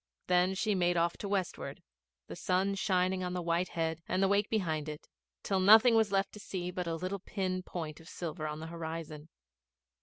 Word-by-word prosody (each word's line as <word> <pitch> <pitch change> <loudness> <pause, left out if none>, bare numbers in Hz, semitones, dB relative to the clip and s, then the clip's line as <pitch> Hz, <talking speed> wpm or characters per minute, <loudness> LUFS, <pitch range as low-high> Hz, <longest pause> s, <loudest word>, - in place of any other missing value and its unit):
Then 180 +1 +3
she 215 +2 +1
made 175 -2 +2
off 170 0 +2
to - - -6
the - - -5
westward, 195 -3 -3 0.4
the - - -8
sun 190 +2 +1
shining 185 -1 +1
on 180 0 -2
the 180 - -2
white 170 +2 +1
head 165 -1 -2
and 190 - +1
the - - +5
wake 200 +1 +2
behind 160 -8 -1
it, 150 0 -8 0.4
till 195 -1 +1
nothing 220 +5 +8
was 220 -3 +3
left 195 0 +1
to 210 - -11
see 180 -3 -4
but 180 -1 -3
a 165 - -1
little 185 +4 -3
pin 185 -1 -2
point 160 -4 -6
of 165 +1 -13
silver 160 -2 -4
on 150 0 -5
the - - -5
horizon. 160 -2 -6
180 Hz, 210 wpm, -32 LUFS, 165-195 Hz, 0.4 s, nothing